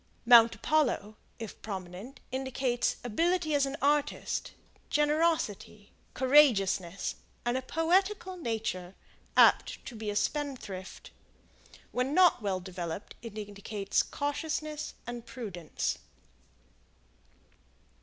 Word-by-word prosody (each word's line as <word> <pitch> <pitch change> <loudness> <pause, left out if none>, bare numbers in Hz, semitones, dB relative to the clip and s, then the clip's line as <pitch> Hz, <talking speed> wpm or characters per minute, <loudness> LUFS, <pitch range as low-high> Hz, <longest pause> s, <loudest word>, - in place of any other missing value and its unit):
Mount 230 -1 +8
Apollo, 245 -9 +1 0.2
if 225 -3 -8
prominent, 195 +6 -7
indicates 260 -1 0
ability 330 +7 +1
as 280 -1 +3
an 275 +1 -4
artist, 290 0 0 0.4
generosity, 295 - 0 0.2
courageousness, 215 - +3 0.3
and 240 +1 +1
a 260 - 0
poetical 370 +7 +1
nature, 220 - -3 0.4
apt - - +5
to 245 - -7
be 215 -1 -4
a 205 - -3
spendthrift. 240 -8 -3 0.8
When 255 +4 -1
not 360 -8 +6
well 195 -3 -1
developed, 180 0 -6
it 225 -2 -8
indicates 205 -1 -1
cautiousness 300 +1 -3
and 240 0 -6
prudence. 215 -9 -4
240 Hz, 95 wpm, -30 LUFS, 205-295 Hz, 0.8 s, Mount